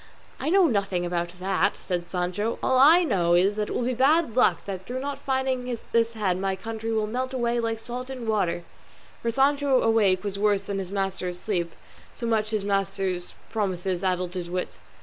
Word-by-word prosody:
"I - - -1
know 380 +1 +5
nothing 200 - 0
about 175 0 -3
that," 190 +1 +1
said 175 -1 -4
Sancho; 185 +5 -1
"all 260 -1 +3
I 320 +7 +7
know 175 - +2
is 190 +4 +3
it 210 - -1
will - - -1
be 250 - 0
my 245 - -4
bad 285 -1 +3
luck 255 - +3
that 190 -2 -6
through 250 +1 -3
not 280 +1 -4
finding 260 -2 -1 0.2
this 230 0 +3
head 195 -5 0
my 195 0 0
county 225 +3 -5
will 220 -1 +1
melt 255 +4 -3
away 240 -1 0
like 225 -1 -1
salt 245 +3 -6
in 255 -3 -6
water;" 180 -6 0 0.6
for 235 - -1
Sancho 275 +2 +3
awake 210 -5 +3
was 200 -1 -4
worse 205 -1 +2
than 200 0 -3
his 190 -1 -5
master 195 -2 -2
asleep, 180 -1 -2 0.4
so 235 - -5
much 220 -2 +1
had 215 -1 0
his - - -7
master's 195 -2 -1 0.2
promises 190 -4 -1
addled 180 -1 0
his 180 -2 -4
wits. 180 +1 -4
210 Hz, 200 wpm, -26 LUFS, 185-245 Hz, 0.6 s, I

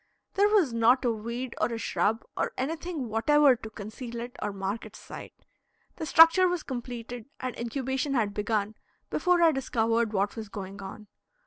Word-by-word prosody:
There 405 +1 +4
was 380 - +3
not 235 +3 +4
a 240 - +3
weed 235 +3 -4
or - - +2
a 230 - -2
shrub 225 0 0
or - - -1
anything 315 0 -3
whatever 275 +5 +4
to 220 -2 -9
conceal 225 +3 -7
it 240 +1 -7
or 210 - -1
mark 195 +2 -3
its - - -11
site. - - -10 0.6
The 320 - -4
structure 330 +4 +7
was 355 -2 -1
completed 245 -1 -6
and 255 -1 -4
incubation 265 +3 -2
had 215 -4 +1
begun 210 0 -1 0.4
before 360 -1 +3
I 330 - +7
discovered 230 -4 0
what 200 -1 0
was 220 -3 -7
going 200 -1 -7
on. 195 +2 -8
235 Hz, 175 wpm, -28 LUFS, 220-275 Hz, 0.6 s, structure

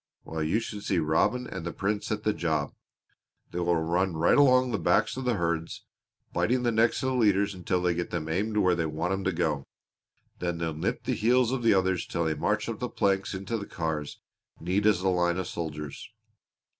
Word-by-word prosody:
Well, 80 0 -4
you 80 +8 +1
should 105 -2 -6
see 95 - 0
Robin 80 +10 +1
and 95 -7 -6
the 85 - -3
Prince 105 +2 -2
at 105 0 -2
the 105 - +2
job. 80 -3 -1 0.8
They 90 - -3
will 85 0 +2
run 85 +2 0
right 85 - +4
along 130 -3 +5
the 110 - -1
backs 80 - +2
of 130 0 -5
the 125 -2 +2
herd, 85 -2 -1 0.6
biting 125 +1 +1
the 120 - +2
necks 115 +3 +2
of 130 - +1
the - - -1
leaders 100 -4 +3
until 90 0 -1
they 90 -1 +2
get 85 +1 -3
them 85 -3 -3
aimed 105 +7 -1
where 90 -3 +4
they 85 -2 0
want 80 +4 -2
'em 95 0 -2
to 95 - +2
go; 80 -5 -1 0.7
then 85 -1 -2
they'll 85 -1 -2
nip 75 - -2
the - - -1
heels 125 +2 +3
of 130 -1 -1
the 115 -3 +4
others 95 -1 +1
till 85 - -1
they 80 - +1
march - - -1
up - - -4
the - - -3
planks 95 0 0
into 100 +4 -3
the 100 - -7
cars 80 -3 -4 0.4
neat 95 +5 +1
as 100 -4 +3
a 95 - 0
line 90 -1 +2
of 95 - -2
soldiers. 75 -5 -6
90 Hz, 220 wpm, -28 LUFS, 85-105 Hz, 0.8 s, along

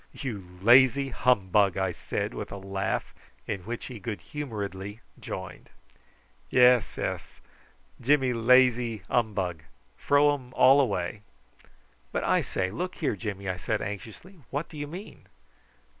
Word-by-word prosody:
"You 100 - -7
lazy 130 +4 +6
humbug!" 100 -6 +2
I 95 -1 0
said - - -4
with - - -6
a 100 - -5
laugh, 95 0 -3 0.3
in 100 - -3
which 120 +2 -5
he 125 -4 -8
good 110 -1 -5
humouredly 105 - -6 0.2
joined. - - -7 0.8
"Yess 125 -3 +4
ess - - -4 0.6
Jimmy 130 0 +3
laze 120 -2 +4
humbug! 95 -8 0 0.3
Fro 145 +1 +4
um 130 -3 -5
all 135 +2 +7
away." 100 -5 -2 0.9
"But - - -2
I - - +3
say, 95 0 -2
look 180 - -4
here, 145 -9 -1
Jimmy!" 100 -3 -5
I 95 -1 -2
said 110 +3 -1
anxiously, 110 - -7
"what 145 +4 -3
do - - -12
you 145 - -4
mean?" 180 +8 -10
115 Hz, 135 wpm, -27 LUFS, 100-135 Hz, 0.9 s, all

